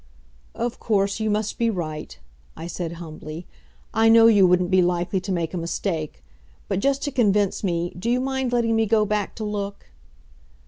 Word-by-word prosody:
"Of 240 Hz, -1 st, -3 dB
course, 200 Hz, -1 st, 0 dB
you 220 Hz, 0 st, 0 dB
must 210 Hz, 0 st, -1 dB
be 230 Hz, -1 st, +2 dB
right," 155 Hz, -, -5 dB, 0.4 s
I 165 Hz, -, -7 dB
said 170 Hz, -1 st, -4 dB
humbly. 160 Hz, 0 st, -8 dB, 0.5 s
"I 225 Hz, 0 st, +4 dB
know 225 Hz, 0 st, +7 dB
you 205 Hz, -5 st, +6 dB
wouldn't 180 Hz, 0 st, +2 dB
be 185 Hz, 0 st, +5 dB
likely 175 Hz, +2 st, 0 dB
to 190 Hz, +2 st, -5 dB
make 170 Hz, -2 st, -2 dB
a 180 Hz, -, -2 dB
mistake, 165 Hz, -2 st, -3 dB, 0.4 s
but, -, -, -1 dB
just 275 Hz, +5 st, +1 dB
to 285 Hz, -, -2 dB
convince 210 Hz, -7 st, +1 dB
me, 175 Hz, -2 st, -1 dB
do 180 Hz, +6 st, -4 dB
you 245 Hz, +1 st, +2 dB
mind 265 Hz, -1 st, -1 dB
letting 235 Hz, -2 st, +1 dB
me 225 Hz, 0 st, +2 dB
go 215 Hz, 0 st, +3 dB
back 210 Hz, -1 st, -2 dB
to 220 Hz, -, -5 dB
look?" 200 Hz, -, -5 dB
200 Hz, 185 wpm, -23 LUFS, 175-225 Hz, 0.5 s, know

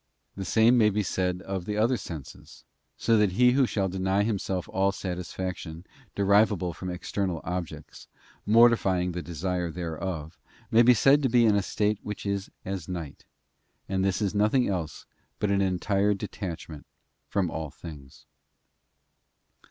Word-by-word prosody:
The 95 Hz, -, -5 dB
same 115 Hz, +4 st, +4 dB
may 105 Hz, -2 st, +5 dB
be 105 Hz, 0 st, 0 dB
said 90 Hz, 0 st, -1 dB
of 95 Hz, -2 st, -4 dB
the 105 Hz, +1 st, -3 dB
other 115 Hz, +4 st, +3 dB
senses, 80 Hz, -, -9 dB, 0.3 s
so 115 Hz, 0 st, +3 dB
that 105 Hz, -3 st, +2 dB
he 125 Hz, +5 st, +5 dB
who 130 Hz, 0 st, +3 dB
shall 100 Hz, -4 st, 0 dB
deny 95 Hz, +2 st, 0 dB
himself 95 Hz, -4 st, -2 dB
all 95 Hz, +1 st, +1 dB
satisfaction 90 Hz, -2 st, -5 dB, 0.3 s
de 100 Hz, -, 0 dB
rivable 100 Hz, -3 st, +3 dB
from 90 Hz, +3 st, -6 dB
external 90 Hz, 0 st, -3 dB
objects, 90 Hz, -2 st, -6 dB, 0.4 s
mortifying 105 Hz, -5 st, +4 dB
the 90 Hz, +1 st, -4 dB
desire 90 Hz, +1 st, -3 dB
thereof, 85 Hz, -1 st, -5 dB, 0.3 s
may 115 Hz, 0 st, +6 dB
be 120 Hz, +1 st, +6 dB
said 135 Hz, +6 st, +5 dB
to 135 Hz, -, +1 dB
be 120 Hz, 0 st, +4 dB
in 105 Hz, -2 st, +4 dB
a 100 Hz, -, +3 dB
state 105 Hz, +2 st, -1 dB
whicli 105 Hz, -1 st, -4 dB
is 100 Hz, 0 st, -3 dB, 0.2 s
as 95 Hz, -3 st, -5 dB
night, 85 Hz, -6 st, -6 dB, 0.6 s
and 95 Hz, 0 st, 0 dB
this 95 Hz, +2 st, 0 dB
is 100 Hz, -, 0 dB
nothing 110 Hz, +5 st, +2 dB
else 85 Hz, -6 st, -4 dB, 0.3 s
but 105 Hz, -, 0 dB
an 100 Hz, 0 st, +2 dB
entire 100 Hz, +2 st, +1 dB
detachment 90 Hz, -6 st, -7 dB, 0.4 s
from 95 Hz, -5 st, 0 dB
all 80 Hz, -2 st, -4 dB
things. 70 Hz, -3 st, -12 dB
95 Hz, 155 wpm, -27 LUFS, 90-105 Hz, 0.6 s, may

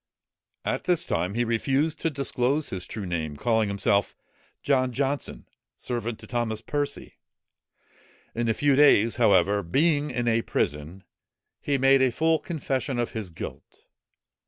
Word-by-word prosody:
At -, -, -2 dB
this 180 Hz, -3 st, +2 dB
time, 100 Hz, -3 st, -1 dB
he 120 Hz, -, +1 dB
refused 135 Hz, +7 st, 0 dB
to 165 Hz, -, 0 dB
disclose 140 Hz, 0 st, -1 dB
his 90 Hz, -2 st, -5 dB
true 105 Hz, -3 st, -6 dB
name, 80 Hz, -4 st, -3 dB
calling 110 Hz, +2 st, +1 dB
himself 100 Hz, 0 st, +1 dB, 0.5 s
John 130 Hz, -2 st, +2 dB
Johnson, 140 Hz, +3 st, -3 dB, 0.3 s
servant 120 Hz, -2 st, -4 dB
to -, -, -10 dB
Thomas 120 Hz, -3 st, -2 dB
Percy. 145 Hz, +5 st, -4 dB, 1.2 s
In 115 Hz, 0 st, -1 dB
a 110 Hz, -, +1 dB
few 145 Hz, -2 st, +3 dB
days, 125 Hz, -6 st, +5 dB
however, 100 Hz, -3 st, +4 dB
being 145 Hz, -, +1 dB
in 120 Hz, -2 st, -2 dB
a 115 Hz, 0 st, +3 dB
prison, 75 Hz, +1 st, -3 dB, 0.6 s
he 140 Hz, -1 st, 0 dB
made 135 Hz, 0 st, +4 dB
a 130 Hz, -, +4 dB
full 160 Hz, +5 st, +2 dB
confession 135 Hz, -5 st, -3 dB
of 120 Hz, -1 st, -1 dB
his 110 Hz, -5 st, -5 dB
guilt. 80 Hz, -, -9 dB
120 Hz, 145 wpm, -26 LUFS, 105-140 Hz, 1.2 s, days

